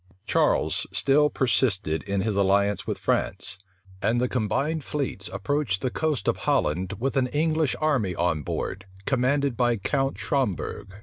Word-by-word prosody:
Charles -, -, +2 dB
still 150 Hz, +2 st, +4 dB
persisted 105 Hz, -, +1 dB
in 100 Hz, -1 st, -1 dB
his 110 Hz, 0 st, -1 dB
alliance 100 Hz, +1 st, +2 dB
with -, -, -2 dB
France; 100 Hz, -, -1 dB, 0.4 s
and 115 Hz, +5 st, +2 dB
the 125 Hz, -, +2 dB
combined 140 Hz, +7 st, -1 dB
fleets 135 Hz, -10 st, -3 dB
approached 140 Hz, -7 st, -1 dB
the 130 Hz, -, -1 dB
coast 150 Hz, -10 st, -1 dB
of -, -, +2 dB
Holland 90 Hz, +6 st, 0 dB
with 135 Hz, +5 st, -2 dB
an 130 Hz, -1 st, +3 dB
English 155 Hz, +1 st, +1 dB
army 130 Hz, -, +1 dB
on 85 Hz, -3 st, 0 dB
board, 95 Hz, +6 st, -4 dB, 0.2 s
commanded 135 Hz, 0 st, +1 dB
by 120 Hz, -1 st, +2 dB
Count 135 Hz, +7 st, -1 dB
Schomberg. 105 Hz, -, -2 dB
120 Hz, 145 wpm, -26 LUFS, 100-140 Hz, 0.4 s, still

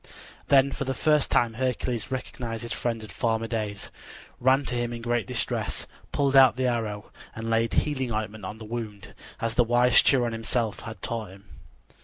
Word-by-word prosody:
Then 140 Hz, -1 st, +5 dB
for -, -, -3 dB
the 135 Hz, 0 st, -2 dB
first 150 Hz, +1 st, +2 dB
time 120 Hz, -2 st, +2 dB
Hercules 125 Hz, -2 st, -1 dB
recognized 120 Hz, -3 st, -4 dB
his 115 Hz, -, -3 dB
friend 115 Hz, -2 st, -2 dB
of 105 Hz, -, -10 dB
former 115 Hz, +2 st, 0 dB
days, 110 Hz, -3 st, -4 dB, 0.5 s
ran 130 Hz, +3 st, +3 dB
to -, -, -1 dB
him 120 Hz, 0 st, -1 dB
in 115 Hz, -1 st, -7 dB
great 120 Hz, -3 st, 0 dB
distress, -, -, -1 dB, 0.3 s
pulled 140 Hz, -1 st, +1 dB
out 135 Hz, -2 st, +8 dB
the 130 Hz, 0 st, -1 dB
arrow, 110 Hz, -4 st, -2 dB, 0.2 s
and 115 Hz, 0 st, -4 dB
laid 115 Hz, 0 st, +1 dB
healing 130 Hz, -5 st, 0 dB
ointment 110 Hz, -1 st, -4 dB
on 105 Hz, +4 st, -6 dB
the 110 Hz, -, -9 dB
wound, 110 Hz, -2 st, -6 dB, 0.3 s
as 115 Hz, -1 st, -1 dB
the 120 Hz, -, +4 dB
wise 120 Hz, +1 st, +5 dB
Chiron 120 Hz, -4 st, +3 dB
himself 115 Hz, -1 st, -1 dB
had 110 Hz, 0 st, -9 dB
taught 115 Hz, -3 st, -3 dB
him. 100 Hz, +2 st, -15 dB
115 Hz, 185 wpm, -26 LUFS, 110-125 Hz, 0.5 s, out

